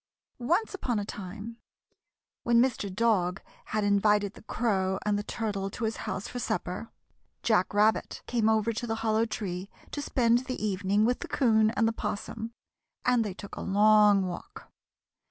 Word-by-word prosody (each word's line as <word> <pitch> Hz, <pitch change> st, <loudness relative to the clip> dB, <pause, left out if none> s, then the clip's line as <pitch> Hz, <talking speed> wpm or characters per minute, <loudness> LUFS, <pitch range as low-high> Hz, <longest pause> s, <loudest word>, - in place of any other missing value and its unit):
Once 345 Hz, -, +1 dB
upon 250 Hz, -, -1 dB
a 205 Hz, -, -2 dB
time, 205 Hz, +3 st, -7 dB, 0.8 s
when 235 Hz, -1 st, +3 dB
Mr. 235 Hz, -5 st, +1 dB
Dog 195 Hz, -3 st, +1 dB, 0.3 s
had 215 Hz, -1 st, -1 dB
invited 205 Hz, 0 st, +3 dB
the -, -, -14 dB
Crow 190 Hz, -5 st, 0 dB
and 210 Hz, -1 st, +2 dB
the 205 Hz, -, 0 dB
Turtle 205 Hz, -2 st, -3 dB
to 230 Hz, -, -6 dB
his 220 Hz, 0 st, -1 dB
house 190 Hz, -, -3 dB
for 245 Hz, -, -5 dB
supper, -, -, -3 dB, 0.5 s
Jack 215 Hz, -5 st, +2 dB
Rabbit 210 Hz, +2 st, +1 dB
came 225 Hz, -3 st, +1 dB
over 220 Hz, +1 st, +2 dB
to 240 Hz, +2 st, -4 dB
the 225 Hz, -, -1 dB
Hollow 220 Hz, +1 st, +2 dB
Tree 190 Hz, -3 st, -4 dB, 0.2 s
to 290 Hz, -, -3 dB
spend 245 Hz, -3 st, +2 dB
the 255 Hz, -1 st, -4 dB
evening 205 Hz, 0 st, +1 dB
with 245 Hz, +2 st, +1 dB
the -, -, -6 dB
'Coon 220 Hz, -5 st, +3 dB
and 225 Hz, 0 st, +1 dB
the 225 Hz, -, 0 dB
'Possum, 225 Hz, +1 st, -4 dB, 0.5 s
and 245 Hz, -2 st, +4 dB
they 200 Hz, -4 st, -5 dB
took 200 Hz, -, -9 dB
a -, -, -6 dB
long 205 Hz, 0 st, +5 dB
walk. 175 Hz, -1 st, -8 dB
215 Hz, 170 wpm, -28 LUFS, 200-230 Hz, 0.8 s, long